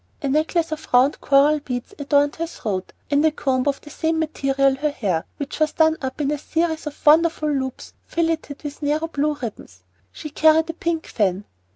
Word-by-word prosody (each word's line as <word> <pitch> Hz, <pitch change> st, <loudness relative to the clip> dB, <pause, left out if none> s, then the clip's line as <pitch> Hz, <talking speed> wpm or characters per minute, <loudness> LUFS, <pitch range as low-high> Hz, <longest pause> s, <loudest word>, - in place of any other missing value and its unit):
A -, -, 0 dB
necklace 315 Hz, +3 st, +1 dB
of 310 Hz, 0 st, -5 dB
round 255 Hz, +4 st, +4 dB
coral 290 Hz, +2 st, +4 dB
beads 250 Hz, +3 st, -5 dB
adorned 285 Hz, +1 st, +2 dB
her 335 Hz, +1 st, -2 dB
throat, 200 Hz, -, -4 dB, 0.2 s
and 285 Hz, +1 st, +3 dB
a 315 Hz, -, +5 dB
comb 265 Hz, -3 st, -1 dB
of 280 Hz, -1 st, 0 dB
the 295 Hz, -, -13 dB
same 320 Hz, +2 st, -1 dB
material 275 Hz, -3 st, +1 dB
her 300 Hz, +2 st, 0 dB
hair, 195 Hz, -, -2 dB
which 285 Hz, +1 st, -5 dB
was 310 Hz, -1 st, +2 dB
done 315 Hz, 0 st, +3 dB
up 260 Hz, +1 st, -4 dB
in 290 Hz, -1 st, 0 dB
a 300 Hz, -, -2 dB
series 320 Hz, 0 st, -1 dB
of 295 Hz, -, -9 dB
wonderful 310 Hz, 0 st, +4 dB
loops 265 Hz, -2 st, -4 dB
filleted 325 Hz, -3 st, -2 dB
with 290 Hz, 0 st, -7 dB
narrow 300 Hz, +2 st, 0 dB
blue 300 Hz, -1 st, -1 dB
ribbons. 210 Hz, -, -8 dB, 0.3 s
She 305 Hz, -, -8 dB
carried 315 Hz, +2 st, +4 dB
a -, -, -18 dB
pink 330 Hz, 0 st, -2 dB
fan. 200 Hz, -2 st, -1 dB
295 Hz, 195 wpm, -22 LUFS, 270-315 Hz, 0.3 s, a